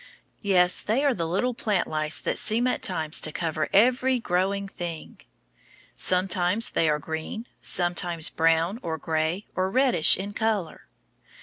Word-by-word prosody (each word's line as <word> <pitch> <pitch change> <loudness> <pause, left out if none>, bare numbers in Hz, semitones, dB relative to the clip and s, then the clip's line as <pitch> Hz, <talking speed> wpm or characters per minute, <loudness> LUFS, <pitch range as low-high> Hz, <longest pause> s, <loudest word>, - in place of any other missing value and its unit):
Yes, 180 -3 +2
they 255 +7 0
are 280 - +3
the 170 -7 -3
little 220 +9 -1
plant 210 -5 -1
lice 155 0 -1
that - - -1
seem 230 +3 +2
at 255 - -1
times 160 -4 +2
to 155 - -1
cover 155 -1 -2
every 255 +4 +3
growing 195 0 -1
thing. 170 -4 -7 0.8
Sometimes 185 +3 0
they 160 - +1
are 150 - +1
green, 160 +9 -6 0.2
sometimes 175 -2 +1
brown, 165 +6 +1
or 160 -6 -4
gray, 160 +5 -2
or 185 0 0
reddish, 255 - +4
in 200 +2 -6
color. 215 -6 -2
180 Hz, 145 wpm, -25 LUFS, 165-215 Hz, 0.8 s, reddish